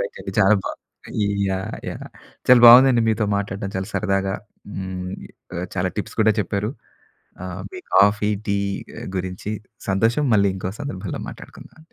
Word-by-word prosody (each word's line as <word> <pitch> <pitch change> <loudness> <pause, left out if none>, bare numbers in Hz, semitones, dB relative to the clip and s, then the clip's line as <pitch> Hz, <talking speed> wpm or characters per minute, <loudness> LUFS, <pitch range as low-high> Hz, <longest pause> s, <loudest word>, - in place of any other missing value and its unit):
Right 485 -1 -4
అండి - - -6
చాలా 95 +3 +6
బా - - -2 0.5
ఈ - - +1 0.2
యాహ్! 95 0 -3 0.2
యాహ్! - - -8 0.4
చాలా 125 -1 +8
బాగుందండి 120 0 +8
మీతో 110 -1 +1
మాట్లాడడం. 100 0 -3
చాలా 95 0 -3
సరదాగా 95 -2 0 0.4
హ్మ్ 95 -1 -5 0.6
చాలా 90 +1 0
టిప్స్ 100 - -5
కూడా 110 0 +4
చెప్పారు 100 +2 -2 0.7
ఆహ్, - - -6
మీ 370 - -7 0.2
కాఫీ, 105 +1 +4 0.2
టి 100 0 +1 0.6
గురించి 90 +2 -4 0.4
సంతోషం. 115 +9 +2
మళ్ళీ 100 -1 +4
ఇంకో 95 - -4
సందర్భంలో 100 -10 -5
మాట్లాడుకుందామండి. 160 +2 -13
100 Hz, 140 wpm, -22 LUFS, 95-115 Hz, 0.7 s, చాలా